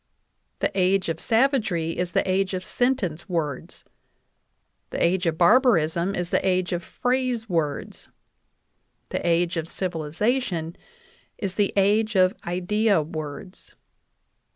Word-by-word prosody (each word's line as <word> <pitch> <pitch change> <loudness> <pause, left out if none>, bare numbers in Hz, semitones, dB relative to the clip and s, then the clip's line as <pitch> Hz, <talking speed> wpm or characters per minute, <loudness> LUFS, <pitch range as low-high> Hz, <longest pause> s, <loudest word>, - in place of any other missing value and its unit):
The - - +1
age 185 -1 +2
of 165 0 -2
savagery 220 - +1
is 180 0 -3
the - - +1
age 190 0 +1
of 185 0 -5
sentence 210 -11 -1
words; 150 -6 -4 1.0
the - - -5
age 180 +1 +2
of 160 -1 0
barbarism 175 - +3
is 175 -1 -3
the - - +1
age 185 -1 +1
of 175 0 -2
phrase 250 -1 -1
words; 160 -6 -3 1.0
the - - -3
age 170 0 +1
of 160 0 -2
civilization 175 - -2 0.6
the 200 0 0
age 210 +2 +2
of 185 0 +4
idea 190 +1 +1
words. 155 +4 -8
185 Hz, 120 wpm, -24 LUFS, 165-210 Hz, 1.0 s, of